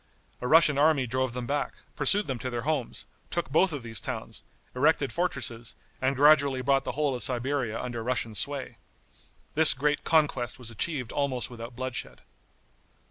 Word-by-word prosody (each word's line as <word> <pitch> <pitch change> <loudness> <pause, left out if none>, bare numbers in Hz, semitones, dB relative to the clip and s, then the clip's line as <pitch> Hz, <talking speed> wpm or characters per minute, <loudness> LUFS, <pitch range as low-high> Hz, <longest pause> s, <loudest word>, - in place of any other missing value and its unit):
A 125 - -2
Russian 155 -1 +5
army 150 -3 +3
drove 130 0 -1
them 125 0 -4
back, 145 +2 -2 0.2
pursued 195 +8 +3
them 130 -3 -4
to 130 - -4
their 120 -1 -4
homes, 145 -4 -2 0.2
took 170 -5 -3
both 180 +5 +4
of 145 -5 -5
these 115 -1 -5
towns, - - -6 0.3
erected 140 +1 +2
fortresses, 120 -10 -1 0.3
and 130 +1 +1
gradually 140 -2 +4
brought 135 +1 +1
the - - -3
whole 145 -2 0
of 125 - -3
Siberia 125 -2 0
under 120 -2 -4
Russian 120 -2 -2
sway. 140 +6 -3 0.8
This 160 0 +8
great 150 +2 0
conquest 140 -7 +1
was 120 -3 -7
achieved 125 +1 -2
almost 130 -4 -2
without 120 0 -9
bloodshed. 130 0 -5
130 Hz, 165 wpm, -27 LUFS, 125-145 Hz, 0.8 s, This